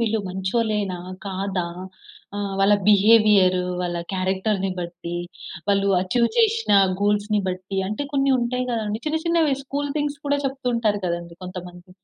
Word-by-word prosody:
వీళ్ళు 225 -1 +1
మంచోలేనా? 195 0 -1 0.3
కాదా? 190 -1 -2 0.7
ఆహ్, 200 -1 -3
వాళ్ళ 200 +1 +5
బిహేవియర్. 205 -3 +5 0.2
వాళ్ళ 175 -1 -2 0.2
క్యారెక్టర్‌ని 190 +1 0
బట్టి. 170 0 -6 0.5
వాళ్ళు 200 0 +2
అచీవ్ 235 +6 +1
చేషిన 450 - +3 0.3
గూల్స్‌ని 205 +1 +1
బట్టి 185 +1 -4
అంటే 215 +7 -3
కొన్ని 275 -1 +2
ఉంటాయి 250 +1 -1
గదండీ. 215 -1 -2
చిన్న 310 +1 +1
చిన్నవి 330 -4 +3
స్కూల్ 285 +1 -3
థింగ్స్ 290 -1 -2
కూడా 285 0 +2
చెప్తూ 270 -1 -6
ఉంటారు 215 -3 +1
కదండీ 170 0 -4
కొంతమంది. 180 0 -9
205 Hz, 135 wpm, -23 LUFS, 185-240 Hz, 0.7 s, వాళ్ళ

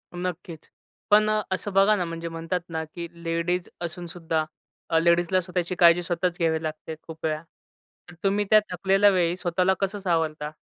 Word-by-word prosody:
नक्कीच. 175 -2 -6 0.4
पण 215 +1 +6 0.2
असं 190 +2 -2
बघा 195 +2 +5
ना, 180 -3 -1
म्हणजे 165 0 -5
म्हणतात 165 +2 -3
ना, 160 -1 -3
की 170 +2 -7 0.2
लेडीज 170 +2 -1
असून 175 +1 -5
सुद्धा 165 -2 -2 0.4
अ, 165 - +3
लेडीजला 170 +2 +3
स्वतःची 180 0 -3
काळजी 170 0 +6
स्वतःच 175 0 -1
घ्यावी 160 -1 +1
लागते 155 0 -5
खूप 160 -1 -8
वेळा. 155 -1 -1 0.7
तर - - -12
तुम्ही 200 +1 +1
त्या 215 - +8
थकलेल्या 195 +3 +4
वेळी 180 -2 +1
स्वतःला 180 +1 +1
कसं 200 +1 -2
सावरता? 160 -5 -1
175 Hz, 165 wpm, -25 LUFS, 165-185 Hz, 0.7 s, त्या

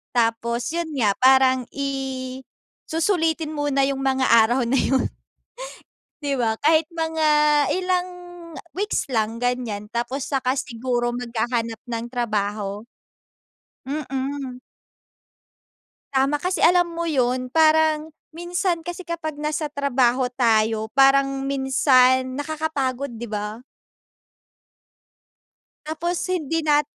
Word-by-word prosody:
tapos, 235 +1 0
yun 340 -1 -2
nga, 215 -6 +3
parang 260 -1 +5
i 265 -2 -4 0.5
susulitin 325 -2 0
muna 290 -2 0
yung 270 0 0
mga 265 -1 +1
araw 235 +3 +5
na 250 +3 +1
yun. 265 -1 +2 1.2
Di 280 - 0
ba? 220 -1 +1
Kahit 315 +1 +3
mga 320 -1 0 0.5
ilang 365 -1 0 0.6
weeks 415 +3 -1
lang 220 0 0
ganiyan, 235 -4 -3
tapos 255 +3 -2
saka 265 -1 -1
siguro 240 0 -2
maghahanap 235 -1 -2
ng 230 -1 -4
trabaho. 210 -4 -2 1.0
Mm. 270 -2 -4 1.5
Tama 275 +2 +2
kasi, 360 +4 -2
alam 355 0 +5
mo 335 0 -3
yun 255 -2 0
parang 315 0 +3 0.2
minsan 350 0 -1
kasi 350 +1 -5
kapag 315 -3 -4
nasa 300 0 -2
trabaho 260 -3 +1
tayo 220 -2 +1
parang 275 0 +3
minsan 260 -1 +3
nakakapagod, 285 -3 -2
di 235 - -6
ba? 210 +3 -5 2.2
Tapos 340 +3 -2 0.2
hindi 325 -2 -2
nat 295 -1 +4
270 Hz, 105 wpm, -23 LUFS, 240-310 Hz, 2.2 s, parang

